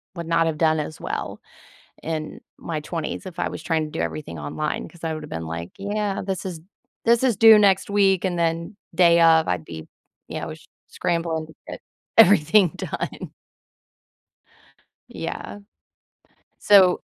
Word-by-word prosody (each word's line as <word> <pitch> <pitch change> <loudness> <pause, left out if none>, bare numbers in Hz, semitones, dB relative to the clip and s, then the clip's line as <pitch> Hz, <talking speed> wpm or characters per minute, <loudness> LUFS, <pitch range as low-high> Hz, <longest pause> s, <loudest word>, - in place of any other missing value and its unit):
would 170 -2 -6
not 165 0 +2
have 160 - -2
done 160 -1 +3
as 150 +1 -5
well - - -5 0.6
in 155 -1 -4 0.2
my 160 -2 -4
20s 160 +3 -5
if 180 -1 -9
I - - -1
was - - -7
trying 160 -2 0
to 150 - -9
do 160 - -5
everything 110 - -5
online, 150 - -4
'cause 170 +1 -18
I 165 -1 -2
would 155 -1 -6
have 150 - -10
been 80 0 -5
like, 85 +1 -6
"Yeah. 205 0 -2
This 190 -2 -4
is 170 -4 -6 0.4
this 235 +2 +4
is 245 -5 +3
due 220 -1 +8
next 195 -2 +3
week," 195 -2 +3
and 175 -2 -1
then 165 +4 -2 0.2
day 170 -2 +5
of, 160 -1 +5
I'd 90 -3 -2
be, 80 -1 -9 0.4
you - - -4
know, - - -5
s - - -12 0.2
scrambling 165 -2 -2
to 160 - -15
get - - -8 0.4
everything 195 -2 +6
done. - - -5 1.8
Yeah. 205 - -6 1.0
So, 190 -3 +5
165 Hz, 165 wpm, -23 LUFS, 155-195 Hz, 1.8 s, due